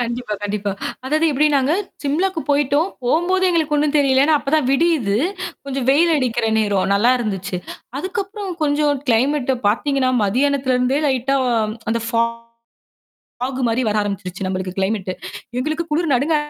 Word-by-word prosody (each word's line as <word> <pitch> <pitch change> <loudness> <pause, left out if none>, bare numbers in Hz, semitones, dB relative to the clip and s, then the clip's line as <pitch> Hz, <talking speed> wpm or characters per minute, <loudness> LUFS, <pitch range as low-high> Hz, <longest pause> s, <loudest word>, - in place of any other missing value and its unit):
கண்டிப்பா, 240 -2 -3
கண்டிப்பா. 205 -1 -2 0.3
அதாவது 310 +4 +1
எப்படினாங்க, 285 0 +2 0.3
சிம்லாக்கு 325 +5 0
போயிட்டோம். 290 +4 +2 0.2
போம்போது 350 +8 +2
எங்களுக்கு 320 -3 +1
ஒண்ணும் 295 0 +1
தெரியல. 270 -2 +4
ஏன்னா, 310 +1 +4
அப்பதான் 285 -1 0
விடியுது. 275 -9 +2 0.5
கொஞ்சம் 270 -2 -3
வெயில் 330 +4 +4
அடிக்கிற 240 -4 0
நேரம், 200 -3 +1
நல்லா 230 +5 +4
இருந்துச்சு. 195 -5 -3 0.4
அதுக்கப்புறம் 395 +3 -4
கொஞ்சம் 290 -1 +1
கிளைமேட் 265 +3 +2 0.2
பார்த்தீங்கன்னா, 260 +4 +1
மத்தியானத்துல 260 +4 +1
இருந்தே 255 +3 +1
லைட்டா 265 +1 +1 0.2
ஆ - - +2 0.4
அந்த 230 +1 0
ஃபா 230 -1 +2 1.2
ஃபாக் 260 +1 -2
மாரி 230 +3 +1
வர 215 0 +1
ஆரம்பிச்சுடுச்சு 195 -2 -4
நம்மளுக்கு 185 -1 -3
கிளைமேட். 195 -1 -1 0.5
எங்களுக்குக் 310 +5 -2
குளிர் 310 -1 +1
நடுங்க 285 +6 +2
270 Hz, 140 wpm, -20 LUFS, 225-300 Hz, 1.2 s, தெரியல